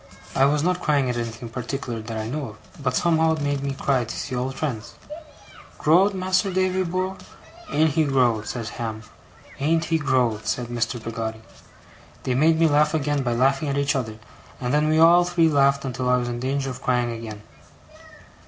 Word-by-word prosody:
I 135 - +5
was 145 +1 +2
not 180 +1 0
crying 140 -6 +2
at - - -4
anything 115 0 -5
in - - -20
particular 125 -2 -4
that 110 0 -6
I 110 0 -3
know 145 +4 -3
of; - - -11 0.2
but 130 -2 0
somehow 160 -1 +3
it 155 - -6
made 145 -1 -1
me 140 -1 -3
cry, 135 -2 +1
to 115 - -6
see 140 - -5
old 130 +2 -2
friends. 125 -8 -4 0.8
'Growed, 185 +6 +4
Mas'r 185 +1 +1
Davy 185 0 +1
bor'? 185 +2 -2 0.5
Ain't 155 +1 +3
he 155 +2 +2
growed!' 125 -6 +2
said 115 -3 -4
Ham. 110 -2 -5 0.6
'Ain't 160 +4 +1
he 165 -1 +1
growed!' 125 -7 0
said 120 -1 -2
Mr. 120 0 -2
Peggotty. 110 0 -5 0.8
They 130 - 0
made 160 +5 +3
me 165 - +5
laugh 150 +1 +3
again 145 -1 0
by 120 -2 -1
laughing 135 +4 +2
at 140 - -1
each 140 +1 +1
other, 110 -5 -3 0.4
and 125 -1 -2
then 150 +1 +3
we 155 - +3
all 170 +2 +7
three 175 -2 +2
laughed 140 -1 +3
until 125 -1 -2
I 125 - +4
was 120 -1 -2
in 120 0 -4
danger 135 +1 -1
of 125 - -9
crying 125 -1 +1
again. 110 -2 -7
135 Hz, 200 wpm, -23 LUFS, 120-155 Hz, 0.8 s, all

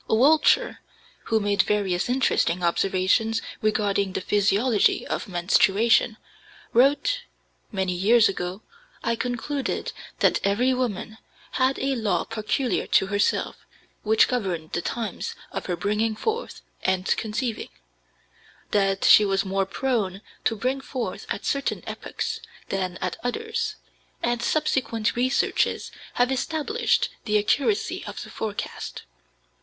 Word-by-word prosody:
Wiltshire, 300 - +4 0.5
who 225 - +2
made 205 -1 +2
various 200 -2 0
interesting 185 -8 +1
observations 195 +6 +2 0.2
regarding 200 -2 +1
the - - -2
physiology 205 +3 +2
of - - -3
menstruation, 205 +5 +3 0.6
wrote: 285 - +3 0.5
"Many 190 -3 -1
years 215 +6 +5
ago, 185 +1 -4 0.4
I 230 0 +1
concluded 250 +4 -3 0.2
that - - +3
every 235 +7 +2
women 225 -3 -3 0.3
had 260 +1 +1
a 270 0 0
law 210 -7 0
peculiar 225 +3 -1
to 190 - +3
herself, 205 0 0 0.4
which 220 +1 +4
governed 185 -10 -2
the 175 - -1
times 240 - -4 0.2
of - - -5
her 180 - 0
bringing 210 +5 0
forth 450 - -3 0.2
(and 185 0 0
conceiving); 225 +2 -3 1.0
that 195 -1 +2
she 215 - +8
was 195 -1 +1
more 195 0 0
prone 205 -4 -1 0.2
to 225 - +2
bring 255 +5 -1
forth 260 -2 -5
at - - -4
certain 280 0 -1
epochs - - -4 0.3
than 185 -2 -2
at 185 -1 -2
others; 450 - -2 0.5
and 240 0 0
subsequent 235 -5 0
researches 255 +2 +1 0.2
have 245 +1 +2
established 320 - 0 0.2
the 210 -1 +2
accuracy 280 - +1
of - - -6
the - - -11
forecast." 215 -2 -5
220 Hz, 120 wpm, -25 LUFS, 195-255 Hz, 1.0 s, she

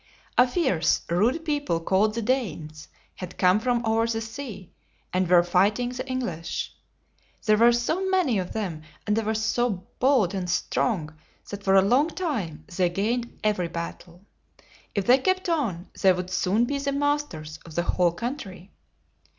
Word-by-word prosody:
A 250 - +6
fierce, 250 - +1
rude 240 - +1
people, 290 - 0
called 195 +5 +1
the 230 - -2
Danes, 190 - -2 0.3
had 180 -1 -8
come 185 +2 +4
from 240 +1 0
over 225 +1 +2
the 225 -1 -1
sea, 225 -5 -7 0.4
and 185 -1 +1
were 175 -1 +6
fighting 200 +7 +2
the 250 +1 -6
Eng 255 0 -1
lish. 170 -7 -4 0.7
There 215 -2 +4
were 235 +2 +6
so 315 +11 0
many 345 - +2
of 180 - -4
them, 185 -8 -3 0.2
and 210 - +1
they 225 - +1
were 220 0 -1
so 220 -3 0
bold 250 -8 +3
and 185 -2 -3
strong, 175 -3 -1 0.4
that 200 0 -5
for 195 0 +3
a 190 - +7
long 255 +9 +3
time 245 - -3
they 180 -1 +2
gained 230 +6 -2
every 205 -5 +1
battle. 170 +2 -7 0.7
If 200 -2 0
they 255 +2 +6
kept 370 +6 0
on, 225 - -1
they 190 - +6
would 180 0 -3
soon 200 +5 +2
be 280 +3 -2
the 280 0 -1
masters 280 - -2
of 165 -2 -12
the 175 - +1
whole 175 -1 +2
country. 195 - -6
215 Hz, 170 wpm, -25 LUFS, 180-250 Hz, 0.7 s, a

